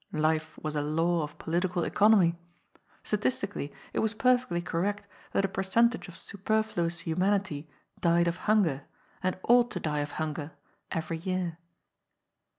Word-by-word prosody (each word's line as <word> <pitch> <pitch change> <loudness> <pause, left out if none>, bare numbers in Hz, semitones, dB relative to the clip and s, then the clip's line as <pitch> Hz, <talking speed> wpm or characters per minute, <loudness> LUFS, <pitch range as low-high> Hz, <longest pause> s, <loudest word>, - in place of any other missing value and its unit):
Life 155 0 0
was 155 0 -4
a 145 - +1
law 165 +3 +1
of 150 -1 -6
political 175 +1 0
economy. 200 -5 +4 0.7
Statisti 210 -1 0
cally 145 - -4 0.2
it - - 0
was 220 0 0
perfectly 250 -6 +2
correct 195 +4 -2 0.3
that 195 - +2
a - - +1
percentage 210 +6 +1
of 175 - -10
super 215 +2 0
fluous 170 -5 -2
humanity 180 -3 0 0.3
died 170 0 +3
of 170 +1 0
hunger, 165 -11 +3 0.4
and 185 0 0
ought 240 0 +5
to 180 - -4
die 150 -3 -1
of 145 0 -3
hun 155 -1 -2
ger, 150 0 -6 0.4
every 165 0 -2
year. 180 -2 -2
175 Hz, 155 wpm, -29 LUFS, 160-205 Hz, 0.7 s, ought